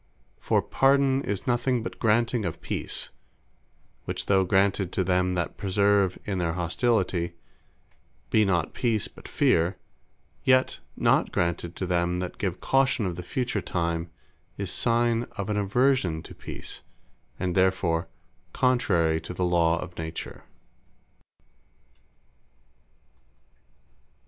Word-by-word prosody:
For - - +1
PARDON, 135 0 +3
is 100 -2 -3
nothing 120 0 +1
but - - -7
granting 115 +1 +2
of 85 -4 -3
Peace; - - -3 0.9
which - - -3
though 95 -1 +4
granted 95 0 +2
to 95 - +1
them 90 0 +1
that 85 -1 -2
persevere 100 -1 +2
in 95 -3 -2
their 85 -2 0
hostility, 90 -1 0 1.0
be 110 - +5
not 85 -5 0
Peace, 115 -4 0
but - - -14
Feare; 85 +3 +2 0.7
yet 130 0 +3 0.2
not - - +3
granted 85 0 -1
to 95 - -3
them 90 0 0
that 90 0 -5
give 95 -6 -2
caution 135 -5 +2
of 90 -2 -2
the 90 - -5
Future 120 +2 -2
time, 85 -1 -2 0.5
is 100 -3 -3
signe 120 0 +2
of 100 +1 -2
an 105 - 0
aversion 100 -5 +1
to - - -10
Peace; - - -7 0.6
and 90 -1 -1
therefore 90 -3 +1 0.5
contrary 85 -11 +2
to 85 +2 -7
the 90 - 0
Law 85 -1 +2
of 90 0 -7
Nature. 80 0 -6
95 Hz, 125 wpm, -26 LUFS, 85-115 Hz, 1.0 s, be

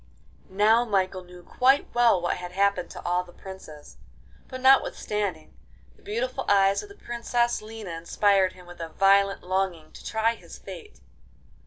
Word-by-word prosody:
Now 215 +5 +4
Michael 190 -4 -1
knew 180 0 -14
quite 265 +8 +2
well 240 -5 +4
what 175 - -1
had 180 0 -8
happened 200 -1 +1
to - - -10
all 180 +1 +1
the 180 - -16
princes, 175 -6 -12 0.5
but 255 - -7
notwithstanding, 210 -9 +1 0.4
the - - -25
beautiful 465 +5 -3
eyes 195 0 +4
of 415 - -12
the 405 - -13
Princess 240 -3 -1
Lina 215 -3 -8
inspired 185 +3 +1
him 180 -1 -15
with 175 -1 -12
a 165 - -5
violent 195 +3 +3
longing 185 -4 -2
to - - -13
try 220 +1 0
his 175 -7 -13
fate. 175 - -11
195 Hz, 160 wpm, -26 LUFS, 180-225 Hz, 0.5 s, Now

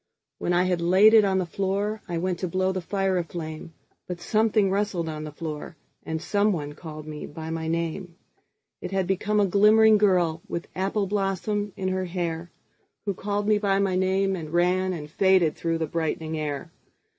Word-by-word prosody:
When - - -1
I 175 +1 +3
had 180 -2 0
laid 190 +6 +6
it 220 -2 +8
on 195 -1 +2
the 185 - 0
floorI 195 0 -2
went 180 0 -1
to 185 - -2
blow 185 +2 0
the 185 -1 -3
fire 195 0 0
a - - -1
flame, 160 -1 -7 0.3
But 180 -1 -5
something 215 0 +2
rustled 195 -4 -1
on 155 -1 -5
the 150 - -7
floor, 155 +2 -6 0.3
And 160 0 -3
someone 180 -5 0
called 155 -1 -9
me 150 -1 -7
by 160 +1 -7
my 160 0 -3
name:It 170 +3 -6
had 190 0 0
become 205 +3 0
a 205 - +4
glimmering 215 +3 +5
girlWith 175 -4 +1
apple 195 +2 0
blossom 205 +1 -1
in 185 -1 -1
her 185 0 -1
hairWho 175 +3 -6
called 205 +1 -2
me 210 -1 +4
by 200 -2 +2
my 195 -2 +1
name 190 +1 +1
and 160 -4 -6
ranAnd 175 -2 0
faded 185 -4 +3
through 165 -1 -1
the 165 - -1
brightening 160 0 -2
air. 145 -3 -4
185 Hz, 175 wpm, -25 LUFS, 165-195 Hz, 0.3 s, it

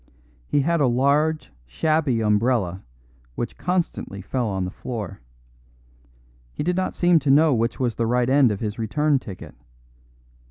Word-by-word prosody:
He 145 - +2
had 165 +2 +1
a 135 - +4
large, 140 - +1 0.2
shabby 140 - 0
umbrella, 105 -4 +1 0.5
which 120 - -4
constantly 180 - -2
fell 120 +5 -2
on 95 -3 -2
the 90 - -5
floor. 105 - -6 1.3
He - - -4
did 180 +3 0
not 185 0 -2
seem 175 -2 +4
to 145 -1 -2
know 150 +2 +5
which 115 +1 -1
was 125 -3 0
the 115 0 -1
right 125 +1 +1
end 135 -3 +4
of 100 - -4
his 105 0 -4
return 145 +6 +1
ticket. 95 -6 -10
125 Hz, 155 wpm, -23 LUFS, 110-150 Hz, 1.3 s, know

